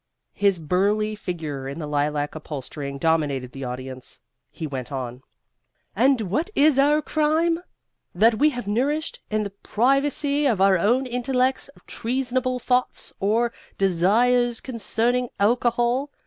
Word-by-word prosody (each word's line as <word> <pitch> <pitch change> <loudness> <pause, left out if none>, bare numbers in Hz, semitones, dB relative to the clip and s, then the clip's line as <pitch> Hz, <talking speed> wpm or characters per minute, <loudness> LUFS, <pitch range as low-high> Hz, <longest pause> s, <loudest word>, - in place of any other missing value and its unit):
His 200 -3 +2
burly 200 +7 +1
figure 160 -9 -5
in 140 - -6
the 160 - -4
lilac 145 0 -1
upholstering 140 -2 -6
dominated 145 -5 0
the 135 +1 -8
audience. 130 0 -7 0.3
He 160 - -6
went 135 -3 -5
on: 125 -2 -5 0.7
"And 255 +3 +3
what 240 - -1
is 290 -1 +4
our 295 +2 +4
crime? 315 +2 +1 0.6
That 220 +4 +4
we 300 +2 +5
have 245 -6 -5
nourished, 275 +10 -1
in 215 0 0
the 200 - -5
privacy 280 +4 +1
of 225 -7 +1
our 190 -1 +4
own 240 +8 +2
intellects, 255 +2 0 0.2
treasonable 255 +1 -1
thoughts 250 0 -1
or 225 +4 +1 0.2
desires 230 +7 +2
concerning 245 0 0
alcohol! 240 +5 +1
220 Hz, 130 wpm, -23 LUFS, 160-255 Hz, 0.7 s, we